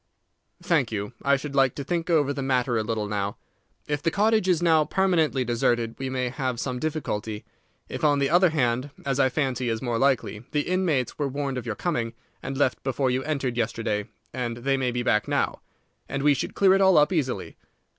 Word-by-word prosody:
"Thank 155 -11 +1
you. 105 +1 -4
I 140 0 +3
should 140 +1 -5
like 135 -2 +3
to 140 - -4
think 170 +4 -2
over 145 -4 +3
the 140 - -4
matter 130 -2 +1
a 110 - +2
little 110 -1 -2
now. 100 -1 -2 0.5
If 145 -1 -1
the - - +1
cottage 215 +2 +2
is 175 -3 +3
now 165 -3 +4
permanently 160 -7 +1
deserted 120 -1 +1
we 135 0 -3
may 130 -1 -1
have 130 -2 -3
some 125 -1 -3
difficulty. 110 -9 -3 0.4
If, - - -6
on 145 -1 +4
the 140 -1 +2
other 175 +4 +5
hand, 130 -3 0 0.2
as 135 -1 0
I 130 - +4
fancy 130 -3 -1
is 115 -1 -1
more 120 -2 -2
likely, 125 -5 +1
the 150 - +2
inmates 165 -9 0
were 145 - +1
warned 135 -1 -3
of 120 - -9
your 110 - -2
coming, 120 - -2 0.3
and 135 - -5
left 130 -3 +1
before 135 0 0
you 130 +1 0
entered 135 -5 -2
yesterday, 110 -3 -1 0.2
then 120 -2 -3
they 135 +3 0
may 130 -2 0
be 120 0 -2
back 105 -3 +2
now, - - -1 0.5
and 135 0 -2
we 145 0 +5
should 135 - -4
clear 195 -1 +5
it 195 - +3
all 190 -3 +5
up 150 +4 +4
easily. 140 -7 -2
135 Hz, 210 wpm, -25 LUFS, 120-150 Hz, 0.5 s, other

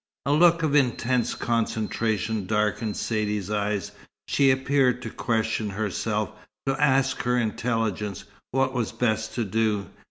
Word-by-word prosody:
A 140 - +1
look 165 +1 +5
of 150 -2 +1
intense 125 -2 +2
concentration 110 -2 -1
darkened 105 0 0
Saidee's 105 -3 -1
eyes. 105 -2 -1 0.4
She 140 -1 +3
appeared 130 -1 +2
to 110 - -5
question 110 -2 -1
herself, 105 +1 -2 0.3
to 135 0 +1
ask 135 -2 +3
her 125 0 +1
intelligence 110 -3 -1 0.3
what 135 0 +1
was 120 -4 -1
best 110 -2 -1
to 120 - 0
do. 105 -1 0
115 Hz, 130 wpm, -25 LUFS, 105-130 Hz, 0.4 s, look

